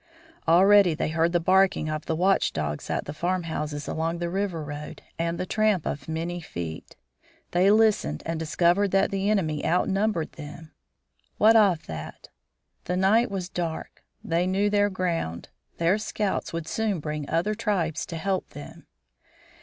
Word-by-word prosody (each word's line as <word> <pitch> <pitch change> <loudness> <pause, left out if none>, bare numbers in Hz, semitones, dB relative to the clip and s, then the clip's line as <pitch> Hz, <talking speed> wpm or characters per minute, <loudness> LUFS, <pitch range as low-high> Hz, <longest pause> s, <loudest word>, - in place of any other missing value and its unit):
Already 185 +1 +6
they 155 - -1
heard 165 +1 +1
the 175 - +2
barking 185 -1 +3
of 155 0 -4
watchdogs 160 - 0
at - - -1
the 145 - -6
farmhouses 160 -4 -3
along 165 +1 -2
the 170 0 -3
river 190 -4 -2
road, 145 0 -8 0.2
and 170 0 -1
the 180 - -2
tramp 215 -3 +1
of 140 -1 -4
many 165 +2 -3
feet. 85 - -7 0.6
They 180 +3 +4
listened 210 - +3
and 165 0 -2
discovered 175 +5 +2
that 195 +1 +2
the 195 +1 0
enemy 160 -8 0
outnumbered 190 +1 +1
them. 155 +1 -10 0.7
What 220 +2 +6
of 200 -7 +4
that! 80 -1 -8 0.6
The 180 - -1
night 215 +6 +3
was 190 -3 -4
dark. 170 -3 -5 0.2
They 170 +2 0
knew 200 +2 +1
their 205 0 +3
ground. 170 - -3 0.3
Their 170 +5 +2
scouts 210 -1 -2
would 165 -1 -4
soon 215 -3 -1
bring 150 -1 -5
other 170 +6 +1
tribes 200 -8 -1
to 170 - -6
help 190 +2 -2
them. - - -11
175 Hz, 155 wpm, -26 LUFS, 160-195 Hz, 0.7 s, Already